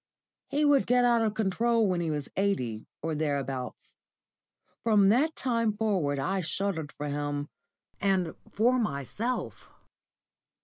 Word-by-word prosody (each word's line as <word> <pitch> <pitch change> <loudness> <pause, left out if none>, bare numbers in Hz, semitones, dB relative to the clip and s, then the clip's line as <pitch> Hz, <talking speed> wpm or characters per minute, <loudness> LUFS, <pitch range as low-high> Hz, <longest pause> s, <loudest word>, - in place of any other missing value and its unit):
He 295 +1 +1
would 285 -2 +4
get 245 0 +4
out 235 -1 +4
of 220 - +2
my 210 - -10
control 225 +2 +2
when 180 -2 0
he 165 - -1
was 150 -2 -3
eighty, 125 - -1 0.2
or 160 - -1
thereabouts. 140 -4 -3 0.9
From 210 -4 +5
that 290 +9 +3
time 230 -4 0
forward 190 -10 0
I 190 +9 0
shuddered 160 -2 -2
for 150 - -5
him, 145 0 -3 0.5
and 190 -4 +1 0.2
for 245 +4 +3
myself. 215 - -3
195 Hz, 135 wpm, -28 LUFS, 145-230 Hz, 0.9 s, From